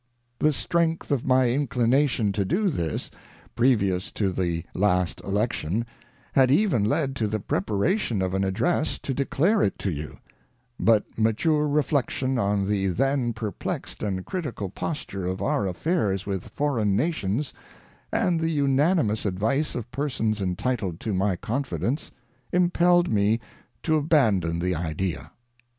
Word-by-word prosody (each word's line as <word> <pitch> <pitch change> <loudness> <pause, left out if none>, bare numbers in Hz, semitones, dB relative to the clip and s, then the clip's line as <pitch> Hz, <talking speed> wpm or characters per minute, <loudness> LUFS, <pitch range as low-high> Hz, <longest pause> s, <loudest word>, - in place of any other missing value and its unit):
ŌĆö - - 0
The 155 - +3
strength 165 +2 0
of 135 -3 0
my 130 -1 +4
inclination 125 -3 +2
to 100 0 0
do 190 - +1
this, 80 - -3 0.4
previous 105 -7 +2
to 100 -3 0
the 85 -2 -1
last 90 -3 +1
election, 105 0 -1 0.5
had 130 -2 +5
even 145 - +3
led 135 +5 0
to 110 - 0
the 110 +1 -2
preparation 105 - 0
of 95 0 -1
an 95 0 +1
address 155 - 0
to 135 - -4
declare 160 - +2
it 95 - +1
to 95 - -2
you; 75 -1 -6 0.6
but 110 -2 +4
mature 150 +8 +2
reflection 140 -3 0
on 100 -2 +1
the 100 -1 +1
then 130 +5 +1
perplexed 110 -2 -5
and 95 -3 -2
critical 140 - -4
posture 100 - -4
of 95 +1 -2
our 100 - 0
affairs 100 - 0
with 95 -3 -3
foreign 115 -9 0
Nations, 140 - -1 0.6
and 175 -2 +1
the 165 0 0
unanimous 140 - +2
advice 110 +10 0
of 120 0 -5
persons 125 -7 -1
entitled 95 -1 -2
to 110 - -2
my 95 0 +1
confidence, 125 - -2 0.4
impelled 175 0 +3
me 105 +2 +2 0.4
to 155 -1 +2
abandon 110 - +2
the 90 +2 0
idea. 80 -2 -3
115 Hz, 140 wpm, -25 LUFS, 95-145 Hz, 0.6 s, had